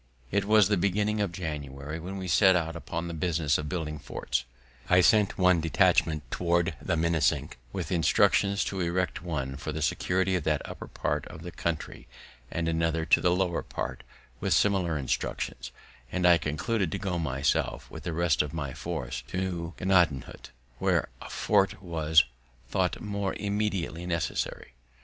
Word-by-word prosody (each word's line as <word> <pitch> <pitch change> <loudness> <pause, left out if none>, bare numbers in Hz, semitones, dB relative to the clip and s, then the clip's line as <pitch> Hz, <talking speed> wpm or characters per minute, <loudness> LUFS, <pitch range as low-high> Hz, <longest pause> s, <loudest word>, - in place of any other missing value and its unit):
It 100 0 +1
was 105 -2 +6
the 105 -1 +2
beginning 105 +3 +1
of 100 -4 0
January 75 -3 -5
when 95 +4 -6
we 95 -1 -5
set 95 +2 +5
out 80 -2 -1
upon 85 0 -4
this 85 -1 -5
business 80 -3 +1
of 75 -1 -4
building 75 -3 -3
forts. - - -3 0.4
I 90 - +6
sent 105 +2 +4
one 90 -2 +4
detachment 80 -1 +3
toward 85 +1 +1
the 85 - 0
Minisink, 80 -5 +1
with - - -4
instructions 100 +4 +3
to 95 - -3
erect 90 +1 -1
one 70 -6 -3
for 75 +3 -4
the 75 0 -3
security 95 +4 +1
of 90 - -1
that 75 -2 0
upper - - -8
part - - -2
of 80 - -10
the 90 - -6
country, 85 -2 -4 0.4
and 85 -1 -2
another 80 0 0
to - - +4
the 90 - +3
lower 90 -1 +1
part, - - -5 0.4
with - - +2
similar 95 -6 +2
instructions; 65 -3 -3 0.4
and 90 -1 0
I 85 -1 +7
concluded 90 +5 -1
to - - -1
go 95 -3 -2
myself 70 -3 0
with - - -8
the 85 - -4
rest 85 -3 +2
of 75 0 -4
my 70 -5 -3
force 65 -1 -4
to 90 -1 -3
Gnadenhut, 90 -8 +1 0.3
where - - +1
a - - -8
fort 100 -1 +2
was 80 -4 +3 0.5
tho't 90 -1 0
more 100 -2 -2
immediately 100 -5 -2
necessary. 85 -7 -2
85 Hz, 165 wpm, -28 LUFS, 80-95 Hz, 0.5 s, I